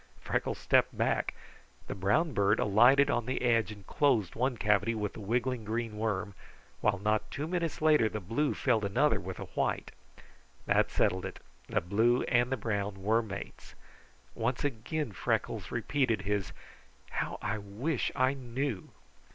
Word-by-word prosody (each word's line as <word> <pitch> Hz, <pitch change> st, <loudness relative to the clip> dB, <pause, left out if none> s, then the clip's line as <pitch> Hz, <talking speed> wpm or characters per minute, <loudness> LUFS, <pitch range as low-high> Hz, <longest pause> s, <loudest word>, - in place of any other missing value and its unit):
Freckles -, -, -2 dB
stepped -, -, +2 dB
back. -, -, 0 dB, 0.5 s
The -, -, -5 dB
brown 130 Hz, -, +1 dB
bird 100 Hz, +1 st, +3 dB
alighted 120 Hz, +7 st, +5 dB
on 120 Hz, -, -1 dB
the 130 Hz, -, -2 dB
edge 115 Hz, -3 st, +2 dB
and 100 Hz, -2 st, -11 dB
closed 120 Hz, -, +2 dB
one 125 Hz, +1 st, 0 dB
cavity 105 Hz, +2 st, +2 dB
with 105 Hz, -2 st, -3 dB
a -, -, -8 dB
wiggling 120 Hz, +3 st, -1 dB
green 110 Hz, 0 st, -3 dB
worm, 105 Hz, -2 st, -2 dB, 0.5 s
while 105 Hz, -2 st, +2 dB
not 105 Hz, +2 st, 0 dB
two 145 Hz, -, -4 dB
minutes 170 Hz, -3 st, -2 dB
later 150 Hz, -8 st, +5 dB
the 105 Hz, -, -4 dB
blue 115 Hz, +10 st, -1 dB
filled 115 Hz, -5 st, +1 dB
another 100 Hz, 0 st, +2 dB
with -, -, -6 dB
a -, -, -5 dB
white. -, -, -1 dB, 0.7 s
That -, -, +3 dB
settled 95 Hz, 0 st, +1 dB
it. -, -, -6 dB, 0.3 s
The -, -, 0 dB
blue 110 Hz, +8 st, +2 dB
and 125 Hz, +1 st, +1 dB
brown 100 Hz, -3 st, -3 dB
were 110 Hz, +3 st, +3 dB
mates. 100 Hz, -3 st, -8 dB, 0.6 s
Once 115 Hz, +4 st, -1 dB
again 145 Hz, +1 st, -2 dB
Freckles 95 Hz, -, -2 dB
repeated 125 Hz, -8 st, 0 dB
his 100 Hz, -2 st, -1 dB, 0.6 s
"How -, -, -2 dB
I 105 Hz, +1 st, -2 dB
wish 115 Hz, +9 st, -2 dB
I 130 Hz, 0 st, +3 dB
knew!" 130 Hz, -4 st, -4 dB
115 Hz, 155 wpm, -31 LUFS, 105-130 Hz, 0.7 s, alighted